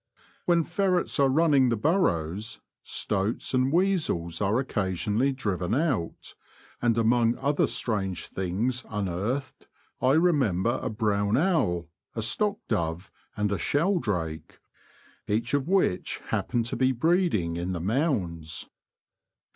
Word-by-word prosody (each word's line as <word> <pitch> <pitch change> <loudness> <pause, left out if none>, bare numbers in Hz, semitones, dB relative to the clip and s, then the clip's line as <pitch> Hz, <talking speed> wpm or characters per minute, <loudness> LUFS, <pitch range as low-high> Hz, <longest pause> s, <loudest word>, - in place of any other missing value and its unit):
When 170 -2 +4
ferrets 180 -1 0
are 140 -1 +5
running 140 -3 +4
the 115 - +1
burrows, 105 - 0 0.2
stoats 100 +5 -2
and 130 +1 +2
weasels 165 - +1
are 100 +3 +2
occasionally 105 +1 0
driven 100 -7 -2
out; 135 - -1 0.5
and 115 -1 +2
among 115 +1 +3
other 145 +2 +1
strange 95 -6 -1
things 110 +8 -2
unearthed 105 +6 -3 0.3
I 130 +1 +4
remember 130 - +2
a - - -2
brown 105 -1 +1
owl, 110 - +1 0.3
a 115 - -2
stock 205 - +1
dove, 85 +2 -2 0.3
and 105 0 0
a 100 - -1
shell 175 +6 +1
drake 80 - -3 0.3
— - - -30
each 115 +4 -1
of 145 0 +1
which 185 - +1
happened 120 -1 0
to 120 - -2
be 130 0 +2
breeding 130 - +1
in 90 +2 -2
the 85 - -3
mounds. 90 - -1
115 Hz, 130 wpm, -27 LUFS, 95-145 Hz, 0.5 s, are